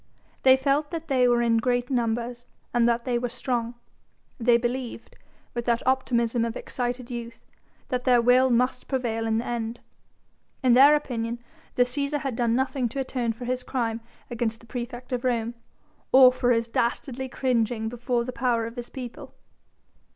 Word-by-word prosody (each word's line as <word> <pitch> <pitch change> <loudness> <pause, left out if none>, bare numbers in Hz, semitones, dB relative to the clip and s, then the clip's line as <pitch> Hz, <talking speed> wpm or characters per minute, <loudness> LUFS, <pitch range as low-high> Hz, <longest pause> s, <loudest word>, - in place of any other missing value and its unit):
They 260 0 +6
felt 285 +2 +1
that 330 -2 -6
they 255 -2 +4
were 240 0 +3
in 230 -1 +3
great 245 +2 0
numbers 240 0 -1 0.3
and 240 -1 +4
that 235 0 0
they 245 -2 0
were 245 0 -2
strong: 240 -1 -2 0.6
they 235 0 +4
believed 240 0 -4 0.4
with 240 -1 -3
that 235 0 0
optimism 240 -3 +1
of 230 -1 -2
excited 245 0 -4
youth 235 -1 -7 0.4
that 250 -1 -1
their 250 -2 +5
will 250 +2 +5
must 250 +1 +1
prevail 230 -4 -1
in 220 0 +1
the 230 - -2
end. 235 -1 -3 0.8
In 250 -2 +5
their 280 +4 +8
opinion 235 -5 -2 0.4
the 250 - +5
Cæsar 280 +3 -2
had 270 -4 -3
done 235 -1 +1
nothing 265 -1 0
to 275 - -5
atone 250 -3 -1
for 245 +2 -8
his 255 +1 -1
crime 230 -3 -2 0.3
against 225 -1 -2
the - - -17
praefect 240 +2 -6
of 245 0 -2
Rome, 235 -2 0 0.6
or 255 -1 +8
for 250 -1 0
his 230 -1 +2
dastardly 250 +3 -2
cringing 235 -3 0
before 240 +1 -1
the 255 - -5
power 235 -2 0
of 230 +2 -8
his 240 0 -6
people. 250 -3 -8
245 Hz, 175 wpm, -26 LUFS, 235-255 Hz, 0.8 s, their